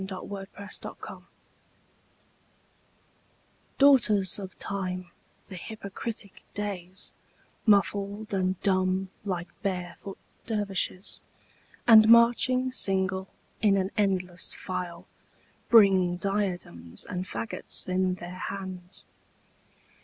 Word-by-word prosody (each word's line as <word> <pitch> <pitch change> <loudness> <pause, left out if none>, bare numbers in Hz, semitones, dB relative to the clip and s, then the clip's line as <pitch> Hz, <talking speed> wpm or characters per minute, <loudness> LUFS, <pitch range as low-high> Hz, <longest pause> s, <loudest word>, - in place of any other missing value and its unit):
Ralph 190 -2 -5
Waldo 195 -1 -6
Emerson 200 0 -4 0.2
Days - - -10 2.5
DAUGHTERS 215 -10 +5
of 190 -2 -8
Time, 185 -2 -3 0.4
the 195 - -8
hypocritic 205 +1 -7
Days, 190 -3 -4 0.6
Muffled 205 +1 +2
and 185 -1 0
dumb 185 -1 +1
like 180 -3 -3
barefoot 185 0 -4 0.3
dervishes, 200 -3 -1 0.6
And 220 -2 +8
marching 240 +2 +5
single 190 -4 +1 0.3
in 200 -2 +4
an 190 +1 0
endless 185 -3 0
file, 180 -2 -5 0.6
Bring 190 -5 +6
diadems 180 - -2
and 180 0 -4
faggots 220 - -4
in 185 0 +1
their 180 0 -8
hands. 185 -2 -7
195 Hz, 90 wpm, -28 LUFS, 185-205 Hz, 2.5 s, And